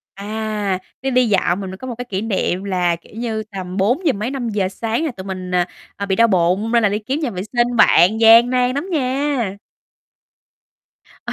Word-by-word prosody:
À, 210 -1 -3 0.2
đi 270 - -1
đi 250 -1 +3
dạo 195 -3 +2
mình 195 -1 -5
mới 190 - -7
có 260 - -8
một 245 - -4
cái 245 - -4
kỷ 200 -5 -4
niệm 195 -3 -1
là, 180 -3 0
kiểu 165 - -21
như, 225 -2 -3
tầm 190 -4 -7
bốn 245 - +1
giờ 290 - +4
mấy, 215 +3 -3
5:00 225 -8 -2
sáng 225 +8 -2
là - - -1
tụi 190 -5 -9
mình, 185 -1 -6
à, 175 -1 +2 0.3
à, 200 - -4
bị 190 -1 0
đau 230 0 +5
bụng 190 +3 +1
nên 235 -1 +4
là 210 - +4
đi 205 +1 -1
kiếm 260 +8 -3
nhà 295 -6 -1
vệ 185 -4 -5
sinh 240 +3 0
bạn, 215 0 +5
gian 230 +2 +7
nan 250 0 +1
lắm 290 +7 -3
nha. 265 - -1 1.7
Ừ - - -3
215 Hz, 215 wpm, -19 LUFS, 190-245 Hz, 1.7 s, gian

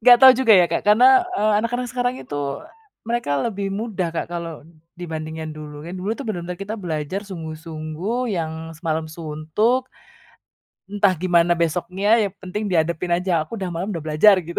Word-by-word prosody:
Nggak 245 +1 +8
tau 260 -1 +11
juga 245 -3 +4
ya, 180 - +6
Kak, 170 0 -1
karena, 230 +5 +7 0.3
eee, 215 0 +2
anak-anak 245 +2 -2
sekarang 245 0 0
itu, 145 - -7 0.3
eee, - - -17 0.3
mereka 235 -7 -2
lebih 200 -3 -2
mudah, 200 -3 -2
Kak, 165 - -2
kalau 165 -3 -6 0.3
dibandingin 160 -2 -5
dulu, 150 0 -9
kan 175 - -7
dulu 190 +4 -3
tuh 280 - -7
bener-bener 180 -3 -4
kita 200 +3 -5
belajar 165 +1 -3
sungguh-sungguh, 165 +7 -4
yang 160 -3 -2 0.2
semalam 160 -1 -2
suntuk, 165 +11 -1 1.0
entah 205 -2 +3
gimana 175 0 +3
besoknya, 185 +7 +1
yang 185 - -17
penting 205 +3 -3
dihadapin 170 0 0
aja, 180 -2 +1
aku 225 +9 -8
udah 185 -3 -4
malem 175 +4 -3
udah 165 -2 -5
belajar 160 +7 +5
gitu. 170 +2 -4
180 Hz, 170 wpm, -22 LUFS, 160-215 Hz, 1.0 s, tau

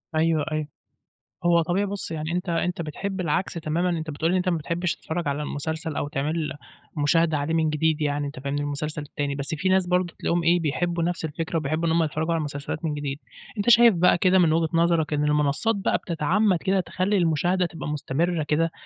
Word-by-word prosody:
أيوه، 160 -1 +2
أيوه 155 -1 -2 0.8
هو 170 -1 +5
طبيعي 180 +5 0
بُصّ، 200 -3 -5
يعني 155 0 -3
أنت 180 +1 -2
أنت 170 +1 -1
بتحب 190 +5 -4
العكس 170 +3 -1
تمامًا، 170 +2 -1
أنت 160 -2 -2
بتقول 160 +3 -1
لي 185 - +2
أنت 180 0 0
ما 170 - +1
بتحبش 170 +3 -2
تتفرّج 165 -1 -4
على 145 +1 -1
المسلسل 160 +2 -3
أو 145 - -1
تعمل 150 +3 -2 0.4
مشاهدة 160 +1 +2
عليه 145 +3 -2
من 160 -1 +2
جديد، 155 0 +1
يعني 145 -1 0
أنت 140 -2 -8
فاهمني، 140 +2 -2
المسلسل 150 +1 -3
التاني 145 -1 -3
بس 140 +3 -3
في 185 +5 -1
ناس 190 -1 +3
برضه 180 -1 +1
تلاقيهم 170 0 0
إيه، 175 +1 +4
بيحبوا 170 +2 -1
نفس 170 -1 -1
الفكرة 165 +2 -3
وبيحبوا 155 +3 -1
إن - - +2
هُم 165 0 +3
يتفرّجوا 160 +2 -1
على - - +1
المسلسلات 145 +1 -4
من 150 - -1
جديد، 145 -1 -4 0.4
أنت 205 +4 +1
شايف 235 -2 +7
بقى 175 0 +4
كده 185 +1 +4
من 165 -3 +4
وجهة 160 -1 +1
نظرك 165 -2 +2
إن 150 0 +1
المنصات 150 +9 +2
بقى 195 - +1
بتتعمّد 180 +4 +1
كده 190 +2 +1
تخلّي 185 +3 0
المشاهدة 175 +2 +2
تبقى 165 -3 -6
مستمرة 155 +3 -1
كده، 160 +2 +1
165 Hz, 205 wpm, -25 LUFS, 150-175 Hz, 0.8 s, شايف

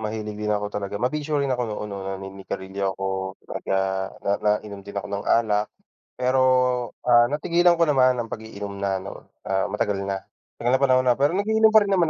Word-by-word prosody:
mahilig 105 -1 -4
din 105 0 0
ako 105 0 -1
talaga 100 -1 -4
mabisyo 145 +6 -1
rin 140 - -1
ako 125 -1 -1
noon, 105 0 -4
'no, 100 - -5
naninigarilyo 95 0 -4
ako, 95 - -5 0.5
nagga 95 +1 -1 0.5
na 100 - +1
nainom 105 -1 -1
din 100 +1 -11
ako 100 - -3
ng 100 0 -3
alak, 105 -2 +2 0.5
pero, 130 +1 +2 0.7
ah, 120 -1 +7
natigilan 170 +3 +3
ko - - +6
naman 130 -3 +4
ang 115 - -7
pag-iinom 105 -2 -7
na, 100 -1 -1
'no, 95 - -10 0.2
ah, 95 0 +1
matagal 105 -1 -1
na. 100 0 -2 0.4
Matagal 120 - 0
na 130 - 0
panahon 130 -1 +4
na, 120 - +4
pero 145 +3 +3
nag-iinom 220 +2 +4
pa 220 - +9
rin 200 - -2
naman 170 -3 +3
105 Hz, 195 wpm, -24 LUFS, 100-130 Hz, 0.7 s, pa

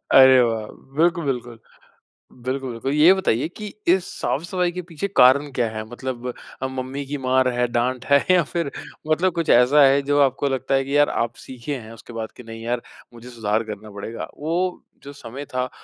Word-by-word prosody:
अरे 130 -1 +8
वाह! 115 -2 -1 0.3
बिल्कुल, 170 0 +2
बिल्कुल। 120 -2 -5 0.9
बिल्कुल, 130 0 -3
बिल्कुल। 115 +4 -3
ये 155 +5 +7
बताइए 170 -10 0
कि 215 - -6 0.2
इस 180 +1 +4 0.2
साफ़-सफाई 175 +3 -1
के 180 +1 -5
पीछे 165 +5 -3
कारण 140 +3 +6
क्या 120 -3 0
है? 110 0 -5
मतलब 125 0 -5 0.3
अ, 130 - 0
मम्मी 130 +1 -5
की 145 +2 -4
मार 130 0 +3
है, 125 0 +2
डाँट 120 +2 -1
है 140 0 +4
या 180 -3 +5
फिर 170 -5 -1 0.4
मतलब 165 +3 +2
कुछ 170 -2 -2
ऐसा 140 +4 +5
है 135 +1 +4
जो 145 - +3
आपको 135 +1 +2
लगता 130 +1 -1
है 135 - +2
कि 140 +2 0
यार 145 0 +5
आप 115 0 -5
सीखे 130 +3 -5
हैं 110 -2 -11
उसके 115 - -13
बाद 110 -1 -5
की 125 - -10
नहीं 115 0 -9
यार, 120 0 -1 0.3
मुझे 120 +1 -12
सुधार 110 -2 -1
करना 105 -1 -8
पड़ेगा। 100 +3 -6
वो 175 +4 -2 0.2
जो 140 - -9
समय 140 +1 -8
था 125 0 0
130 Hz, 195 wpm, -22 LUFS, 120-145 Hz, 0.9 s, अरे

